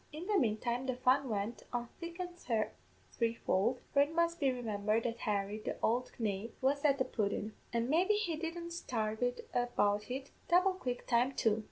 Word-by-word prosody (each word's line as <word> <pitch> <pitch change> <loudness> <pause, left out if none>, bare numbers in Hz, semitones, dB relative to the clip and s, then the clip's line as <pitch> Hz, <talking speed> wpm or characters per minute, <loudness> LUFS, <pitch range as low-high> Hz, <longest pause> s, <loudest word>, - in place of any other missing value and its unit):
"In 310 +3 -6
the 425 - 0
manetime 240 - +1
the 255 - 0
fun 255 +1 +3
went 210 +2 -2
on 240 -1 -2
thick 340 +1 -7
an' 360 -1 -3 0.8
threefold, 230 0 +1
for 280 - +6
it 285 +2 +2
must 335 +1 +1
be 280 -3 +3
remimbered 220 -2 0
that 235 0 -2
Harry, 205 0 -1
the - - -3
ould 245 +3 +1
knave, 215 0 -2
was 280 +2 +1
at 280 -2 +4
the 260 - +1
pudden; 210 0 -1 0.2
an' 235 0 0
maybe 360 +9 +4
he 380 -6 0
didn't 335 +2 -4
sarve 220 -9 -2
it 245 0 -1
about 210 -4 +1
in 265 +2 -2 0.3
double 365 +2 +5
quick 250 -9 -4
time 245 +2 +3
too. 220 -4 +2
245 Hz, 185 wpm, -34 LUFS, 220-310 Hz, 0.8 s, for